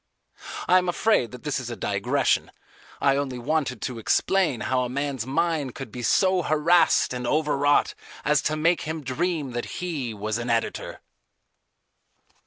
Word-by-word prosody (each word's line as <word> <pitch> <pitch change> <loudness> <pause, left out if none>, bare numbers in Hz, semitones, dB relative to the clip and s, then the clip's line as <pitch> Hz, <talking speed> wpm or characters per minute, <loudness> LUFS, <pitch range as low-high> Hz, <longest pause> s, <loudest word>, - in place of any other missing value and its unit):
I 185 - +6
am 180 -1 -2
afraid 175 - +2
that 125 -1 -11
this 150 -2 -1
is 125 -2 -6
a 120 - -4
digression. 100 - 0 0.5
I 140 -1 +3
only 135 -3 -2
wanted 130 -2 -1
to 125 -3 -4
explain 170 - +1
how 130 -1 0
a 125 - -3
man's 135 -2 -3
mind 155 -2 0
could 135 -5 -7
be 125 - -6
so 185 - +3
harassed 155 -1 +3
and 125 -1 -4
overwrought 145 0 +2 0.3
as 150 -1 +3
to 155 - -2
make 165 +3 +2
him 160 -1 -4
dream 150 +1 -2
that 120 0 -5
he 155 -9 -3
was 105 +2 -3
an 120 +1 -4
editor. 115 -1 -2
140 Hz, 160 wpm, -25 LUFS, 125-160 Hz, 0.5 s, I